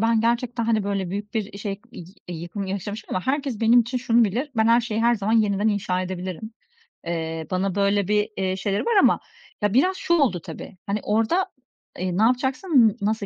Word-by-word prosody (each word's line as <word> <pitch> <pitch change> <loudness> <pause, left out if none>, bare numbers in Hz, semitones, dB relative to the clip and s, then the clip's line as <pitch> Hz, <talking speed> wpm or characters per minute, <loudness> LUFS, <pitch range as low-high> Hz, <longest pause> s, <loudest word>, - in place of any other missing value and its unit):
ben 225 0 +3
gerçekten, 235 0 0
hani, 220 -3 +1
böyle 195 -3 -2
büyük 205 +2 -5
bir 205 -2 -3
şey 205 -1 -3 0.2
i 175 - -9 0.2
eee, 175 - -4
yıkım 175 +4 -5
yaşamışım 200 +3 -5
ama 185 - -2
herkes 270 -4 -1
benim 230 +2 +6
için 245 +2 -2
şunu 235 -1 +3
bilir: 245 +9 -2
Ben 220 0 +3
her 235 +1 +5
şeyi 225 -2 -2
her 235 +1 +4
zaman 210 0 -1
yeniden 210 -1 +2
inşa 185 -3 0
edebilirim. 185 +3 -5 0.5
Eee, 160 -1 -3
bana 190 +1 0
böyle 200 -1 +2
bir, 210 0 +1
eee, 190 -1 0
şeyleri 195 +1 -1
var 470 - +1
ama - - +4 0.4
Ya, 205 -1 +1
biraz 365 +10 +3
şu 340 - 0
oldu, 275 - +3
tabii. 190 - -9
Hani, 200 +1 -1
orada, 225 - +1 0.5
eee, 180 0 -2
ne - - +2
yapacaksın, 260 - +3
n 210 - -7
nasıl 215 0 0
210 Hz, 205 wpm, -24 LUFS, 195-235 Hz, 0.5 s, benim